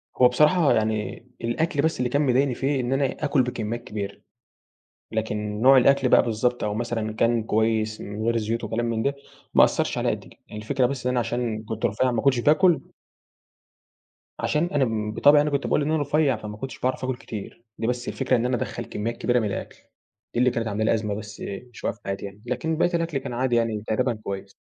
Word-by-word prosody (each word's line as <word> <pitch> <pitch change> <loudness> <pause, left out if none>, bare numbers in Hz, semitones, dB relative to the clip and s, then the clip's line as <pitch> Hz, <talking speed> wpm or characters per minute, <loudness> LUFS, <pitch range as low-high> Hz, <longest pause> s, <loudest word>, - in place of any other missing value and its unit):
هو 125 - +6
بصراحة 150 +5 +4
يعني 110 0 -1 0.2
الأكل 145 +7 0
بس 160 +2 +1
اللي 125 -1 0
كان 145 +4 +1
مضايقني 130 0 +2
فيه 135 +2 0
إن 125 +1 -1
أنا 135 +1 +2 0.2
آكل 145 -2 +3
بكميات 120 -1 -4
كبيرة، 100 -3 -6 0.9
لكن 105 -1 -2
نوع 135 +2 +7
الأكل 135 +1 +4
بقى - - +6
بالضبط 120 +2 0
أو 105 -1 -1
مثلًا 115 -1 -2
كان 115 +1 +2
كويس 110 0 0
من 105 +2 -6
غير 115 +1 +2
الزيوت 115 +1 -1
وكلام 115 +2 -1
من 115 -1 -1
ده، 140 +3 0 0.4
ما - - +8
أثّرش - - 0
عليّا - - +1
قد - - -3
كده. - - -17
يعني 105 - -7
الفكرة 125 +3 +1
بس 130 -1 -4
إن 125 - +3
أنا 125 - +1
عشان 115 -2 -2
كنت 110 0 -2
رفيع 125 +5 +1
ما 115 -2 -1
كنتش 135 -3 +3
باكل 155 +3 +4 1.6
عشان 150 +2 +1
أنا 115 -7 0
بطبعي 145 +6 +5
أنا 150 - 0
كنت 140 -1 -1
باقول - - +2
إن 145 +2 0
أنا 160 -1 +1
رفيع، 145 -2 +2
فما 105 -1 -8
كنتش 130 0 -7
باعرف 130 +1 -1
آكل 130 0 -1
كتير 115 -1 -8
دي 115 - -2
بس 125 0 -2
الفكرة 135 -1 0
إن 120 0 0
أنا 125 0 +1
أدخل - - -4
كميات 115 +3 -4
كبيرة 125 0 +2
من 110 - -1
الأكل، 100 - -5 0.6
دي - - 0
اللي 125 0 +4
كانت 115 -2 -2
عاملة 105 +1 -1
لي - - +3
أزمة 105 -2 -1
بس 105 0 -8 0.3
مش - - -13
واقف 105 - -2
حياتي 100 0 -3
يعني 100 +1 -10
لكن 140 +6 -2
بقيت 175 +1 +2
الأكل 165 -3 -1
كان 130 -2 -5
عادي 125 0 +1
يعني 115 -3 0
تقريبًا 125 +2 +1
كويس. 100 -1 -6
120 Hz, 215 wpm, -25 LUFS, 110-135 Hz, 1.6 s, ما